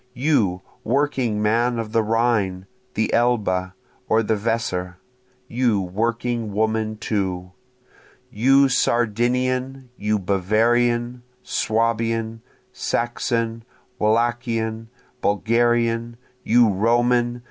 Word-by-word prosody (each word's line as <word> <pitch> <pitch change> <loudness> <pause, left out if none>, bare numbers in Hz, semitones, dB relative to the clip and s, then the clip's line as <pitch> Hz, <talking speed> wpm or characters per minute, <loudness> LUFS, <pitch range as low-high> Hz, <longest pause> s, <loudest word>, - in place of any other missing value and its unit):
You 115 - +1 0.2
working 125 -4 0
man 120 +3 +1
of 115 -2 -4
the 115 0 +2
Rhine, 110 -4 0 0.3
the 110 0 0
Elbe, 100 -6 +1 0.4
or 110 +1 +3
the 110 +1 +1
Weser! 100 -5 -2 0.5
you 120 -4 +1
working 115 +4 -2
woman 110 +1 -1
too! 95 -4 -3 0.8
You 135 +5 +4
Sardinian! 125 +2 0
you 105 +1 0
Bavarian! 120 +6 +1 0.2
Swabian! 115 0 -1 0.3
Saxon! 115 -1 -2 0.4
Wallachian! 115 0 0 0.3
Bulgarian! 115 +2 +1 0.3
You 120 +1 +4
Roman! 120 +4 +1
115 Hz, 85 wpm, -22 LUFS, 105-120 Hz, 0.8 s, You